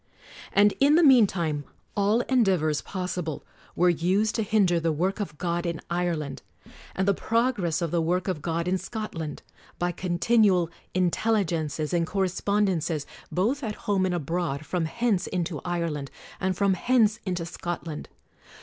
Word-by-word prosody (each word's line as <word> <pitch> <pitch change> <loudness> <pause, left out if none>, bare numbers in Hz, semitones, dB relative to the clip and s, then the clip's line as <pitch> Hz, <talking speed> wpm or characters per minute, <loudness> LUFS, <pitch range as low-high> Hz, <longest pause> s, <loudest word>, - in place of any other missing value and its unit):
And 205 +1 +5
in 285 +2 +5
the 340 - +5
meantime 190 - +4 0.3
all 205 +3 +3
endeavors 185 - +2
possible 180 -4 -4 0.3
were 180 - +3
used 190 +6 +1
to 225 - 0
hinder 195 -5 +2
the 165 0 +1
work 185 +7 -1
of 190 -7 -4
God 170 +1 -1
in 170 -2 -2
Ireland, 170 -5 -2 0.5
and 190 +1 0
the 200 - +5
progress 210 -7 0
of 165 - -2
the 170 - +1
work 175 +2 0
of 180 -6 -2
God 165 +2 -2
in 185 +1 +1
Scotland; 185 -7 -5 0.3
by 175 0 0
continual 180 0 +2 0.2
intelligences 175 -5 0
and 170 -1 +1
correspondences, 190 -5 0 0.3
both 230 +11 0
at 215 -2 -3
home 195 -2 +2
and 180 - -1
abroad, 165 -2 -2
from 175 0 -1
hence 210 +1 0
into 175 -4 -2
Ire 170 -2 -1
land, 140 -2 -5 0.3
and 185 -1 -1
from 200 -1 +3
hence 220 +1 +2
into 180 -3 -2
Scotland. 170 -2 -5
180 Hz, 150 wpm, -26 LUFS, 165-205 Hz, 0.5 s, And